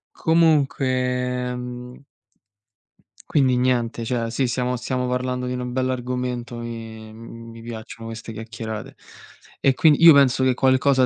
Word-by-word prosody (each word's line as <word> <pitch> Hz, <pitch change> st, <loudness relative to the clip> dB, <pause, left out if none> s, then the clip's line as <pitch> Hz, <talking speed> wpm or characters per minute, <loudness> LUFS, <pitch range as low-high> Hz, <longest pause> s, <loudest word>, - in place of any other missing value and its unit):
Comunque, 160 Hz, -4 st, +2 dB, 0.7 s
ehm 125 Hz, 0 st, -7 dB, 1.3 s
Quindi 130 Hz, -4 st, +3 dB
niente, 120 Hz, -2 st, 0 dB
cioè 115 Hz, -2 st, -2 dB
sì 130 Hz, +2 st, 0 dB
siamo 125 Hz, +1 st, -1 dB
stiamo 125 Hz, +1 st, -2 dB
parlando 125 Hz, 0 st, -2 dB
di -, -, -3 dB
una 125 Hz, 0 st, -3 dB
bell'argomento 125 Hz, -1 st, -3 dB
e, 115 Hz, -2 st, -8 dB
mhmm, 115 Hz, +1 st, -11 dB
mi 115 Hz, 0 st, -11 dB
piacciono 115 Hz, 0 st, -8 dB
queste 115 Hz, 0 st, -7 dB
chiacchierate. 110 Hz, -1 st, -7 dB, 0.6 s
E 135 Hz, -, +3 dB
quin 150 Hz, +2 st, +5 dB
io 165 Hz, -2 st, +9 dB
penso 135 Hz, -2 st, +4 dB
che 130 Hz, -, +3 dB
qualcosa 130 Hz, 0 st, +3 dB
125 Hz, 130 wpm, -22 LUFS, 115-130 Hz, 1.3 s, io